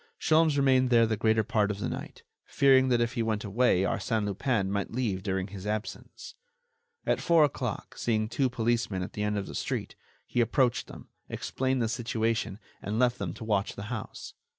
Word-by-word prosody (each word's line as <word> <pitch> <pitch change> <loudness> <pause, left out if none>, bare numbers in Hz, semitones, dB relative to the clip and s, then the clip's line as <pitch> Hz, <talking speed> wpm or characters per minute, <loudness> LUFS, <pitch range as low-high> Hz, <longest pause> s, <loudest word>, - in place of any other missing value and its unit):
Sholmes 155 -2 +3
remained 130 -2 +4
there 115 -2 +5
the 110 0 0
greater 110 +1 +2
part 105 0 +1
of 105 - -2
the 100 - -3
night, - - -7 0.2
fearing 135 -1 +4
that 120 -1 +3
if 120 +2 0
he 120 - -1
went 110 -2 -1
away 110 -2 +2
Arsène 105 +2 -1
Lupin 100 -1 0
might 100 -1 -1
leave 115 -6 -2
during 95 -1 -2
his 100 0 -8
absence. 105 +1 -5 0.7
At - - +1
four 170 -2 +5
o'clock, 145 - -2
seeing 110 -2 0
two 130 +3 0
policemen 115 -5 -1
at - - -7
the 105 - -4
end 105 0 0
of 100 - -2
the - - -9
street, - - -3 0.3
he 120 - 0
approached 120 +1 +1
them, - - -12 0.2
explained 130 -1 -1
the - - +1
situation 115 -2 -1 0.2
and 105 +2 -3
left 125 0 +2
them 95 -5 -3
to 110 - -8
watch 105 -2 0
the 105 +4 -6
house. 110 - -7
115 Hz, 195 wpm, -28 LUFS, 105-125 Hz, 0.7 s, there